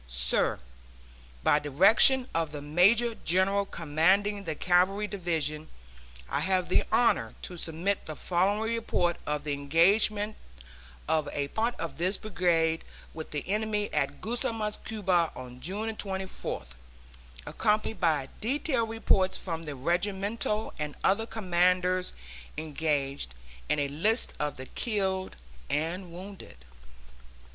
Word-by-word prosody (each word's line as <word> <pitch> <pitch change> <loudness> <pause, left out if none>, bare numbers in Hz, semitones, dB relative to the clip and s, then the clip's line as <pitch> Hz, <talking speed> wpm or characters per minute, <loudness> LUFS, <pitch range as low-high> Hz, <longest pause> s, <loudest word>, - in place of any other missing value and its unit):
SIR: - - +1 0.9
By 150 - +4
direction 210 - +5
of 165 -2 0
the 145 -1 -6
major 200 +10 +4
general 195 +1 +1
commanding 190 +7 +1
the 160 - -2
Cavalry 185 +5 +2
Division, 160 -6 -2 0.6
I - - -1
have 185 -2 0
the - - +3
honor 115 - +2
to 180 - -5
submit 170 +4 -1
the 155 - -5
following 200 +8 0
report 180 -7 0
of 150 -1 -1
the 150 -1 -2
engagement 200 +9 +3 0.7
of 155 -1 +1
a 140 -1 -2
part 230 +6 -1
of 160 -3 -5
this 185 +3 +1
brigade 170 -5 +1 0.3
with 160 -1 -7
the 150 - -5
enemy 210 +1 -1
at - - -1
Guasimas, 225 -2 -2
Cuba, 185 -6 +1
on 125 0 -9
June 210 +7 -2
24th, 190 - -5 0.8
accompanied 215 0 0
by 155 -6 +2
detailed 250 -1 0
reports 195 -4 +2
from 165 -3 -4
the 150 -3 -6
regimental 200 - -1
and 150 -1 -4
other 225 +4 +2
commanders 180 -2 +1 0.5
engaged, 145 - -2 0.3
and 150 - +2
a 140 - +1
list 205 - +2
of 150 -1 -2
the 130 - -7
killed 190 - -2 0.3
and 170 +4 -2
wounded 180 - -11
180 Hz, 125 wpm, -28 LUFS, 155-210 Hz, 0.9 s, direction